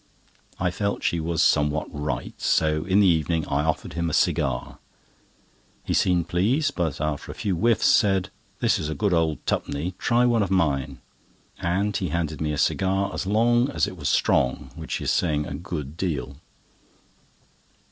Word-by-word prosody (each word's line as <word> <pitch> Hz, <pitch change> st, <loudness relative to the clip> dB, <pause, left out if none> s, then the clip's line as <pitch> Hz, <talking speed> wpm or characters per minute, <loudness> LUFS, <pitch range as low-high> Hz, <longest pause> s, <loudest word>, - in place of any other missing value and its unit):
I 90 Hz, 0 st, +1 dB
felt 100 Hz, +2 st, -2 dB
she 85 Hz, -, +1 dB
was 80 Hz, 0 st, 0 dB
somewhat 75 Hz, +1 st, +2 dB
right, 75 Hz, -4 st, -3 dB
so 75 Hz, 0 st, +1 dB
in 95 Hz, +2 st, +3 dB
the -, -, +5 dB
evening 80 Hz, -1 st, +1 dB
I 70 Hz, 0 st, 0 dB
offered 80 Hz, 0 st, -2 dB
him 85 Hz, -1 st, -1 dB
a -, -, -5 dB
cigar. 65 Hz, -3 st, 0 dB, 1.0 s
He -, -, -2 dB
seemed 90 Hz, -2 st, +2 dB
pleased, 130 Hz, -, +1 dB
but, 80 Hz, -6 st, -1 dB
after 75 Hz, -1 st, -3 dB
a -, -, -10 dB
few 100 Hz, -3 st, -1 dB
whiffs, 115 Hz, +6 st, +2 dB
said: 95 Hz, -2 st, +3 dB, 0.3 s
"This -, -, +2 dB
is 75 Hz, -, -3 dB
a 80 Hz, -, -3 dB
good 95 Hz, +6 st, 0 dB
old 80 Hz, -2 st, 0 dB
tup'ny—try 90 Hz, +11 st, 0 dB
one 120 Hz, -2 st, +3 dB
of 100 Hz, -, 0 dB
mine," 75 Hz, -9 st, 0 dB, 0.6 s
and 100 Hz, +4 st, 0 dB
he 95 Hz, -, -1 dB
handed 80 Hz, -2 st, -2 dB
me 75 Hz, -1 st, 0 dB
a 75 Hz, -, -3 dB
cigar 95 Hz, +5 st, +1 dB
as 95 Hz, -, -3 dB
long 120 Hz, +5 st, +3 dB
as -, -, +1 dB
it -, -, -7 dB
was 75 Hz, -5 st, -2 dB
strong, 65 Hz, -1 st, +1 dB
which -, -, -4 dB
is -, -, 0 dB
saying 75 Hz, -3 st, +1 dB
a -, -, -6 dB
good 75 Hz, -1 st, -6 dB
deal. 70 Hz, -8 st, -3 dB
85 Hz, 170 wpm, -24 LUFS, 75-95 Hz, 1.0 s, the